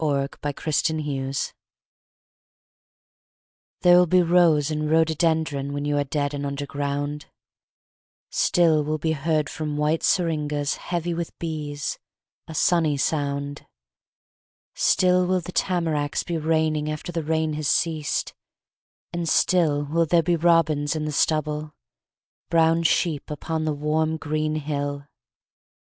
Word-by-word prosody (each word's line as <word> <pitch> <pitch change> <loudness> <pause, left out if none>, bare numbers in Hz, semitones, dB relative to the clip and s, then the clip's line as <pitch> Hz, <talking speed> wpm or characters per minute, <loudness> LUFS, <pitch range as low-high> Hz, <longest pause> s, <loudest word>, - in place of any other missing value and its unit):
ELEGY 140 -2 +1
BEFORE 145 +2 -3
DEATH 140 -4 -2 2.3
There 175 0 +7
will 180 - +4
be 180 +2 +4
rose 165 -4 +3
and 150 0 -2
rhododendron 160 -3 +1
When 145 0 -3
you 145 0 0
are - - +2
dead 145 +1 -2
and 145 0 -4
under 140 0 -3
ground; 145 +1 -3 1.0
Still 160 -3 +3
will 155 +1 -1
be 160 +1 -1
heard 155 0 0
from 155 -2 -4
white 150 +2 +1
syringas 150 -4 0
Heavy 175 -1 -3
with 170 0 -5
bees, 150 -3 -4 0.5
a 160 - -8
sunny 160 -3 +2
sound; 140 0 -2 1.1
Still 180 -1 +3
will 185 0 +2
the 180 - -8
tamaracks 160 -5 0
be 170 - -3
raining 155 -1 0
After 155 +3 -5
the 165 -1 -2
rain 160 0 0
has 150 -1 -2
ceased, 155 -2 0 0.8
and 170 -1 -2
still 155 -6 +2
Will 165 +3 +1
there 170 +1 +3
be 175 +2 +2
robins 160 -3 +2
in 155 -1 -2
the 155 - -2
stubble, 150 0 0 0.7
Brown 165 0 +3
sheep 165 -2 0
upon 155 +2 -3
the 155 - 0
warm 155 +2 0
green 155 0 -2
hill. 145 -1 -3
155 Hz, 130 wpm, -24 LUFS, 145-165 Hz, 2.3 s, There